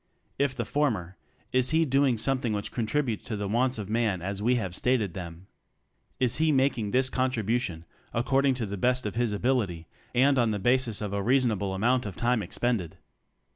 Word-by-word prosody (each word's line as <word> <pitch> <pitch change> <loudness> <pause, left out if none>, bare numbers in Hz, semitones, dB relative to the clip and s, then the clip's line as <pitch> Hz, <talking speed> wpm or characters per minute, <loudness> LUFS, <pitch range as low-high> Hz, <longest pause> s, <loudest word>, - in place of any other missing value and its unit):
If 140 -2 +1
the 120 - -2
former, 105 - -1 0.4
is 130 0 +2
he 160 +1 +3
doing 135 -3 +2
something 125 0 0
which 100 -1 -3
contributes 120 0 -1
to 115 - -3
the 100 -1 -3
wants 125 +4 +1
of 105 -3 -5
man 110 -3 0
as 100 +1 -3
we 120 +4 +3
have 95 -7 -2
stated 110 -3 0
them? 85 -1 -8 0.7
Is 125 -1 +2
he 160 0 +3
making 130 -6 +1
this 130 +4 +2
contribution 120 -9 -1 0.3
according 135 +3 +2
to 120 -3 -2
the 100 0 -5
best 125 +4 +1
of 105 - -2
his 120 -1 0
ability, 105 -7 0 0.3
and 135 +2 +4
on 120 -2 +3
the 105 - -1
basis 120 0 +1
of 105 -2 -3
a 100 - -1
reasonable 110 -5 +1
amount 120 +4 +1
of 95 - -7
time 120 +1 +1
expended? 100 -2 -2
120 Hz, 185 wpm, -27 LUFS, 100-130 Hz, 0.7 s, and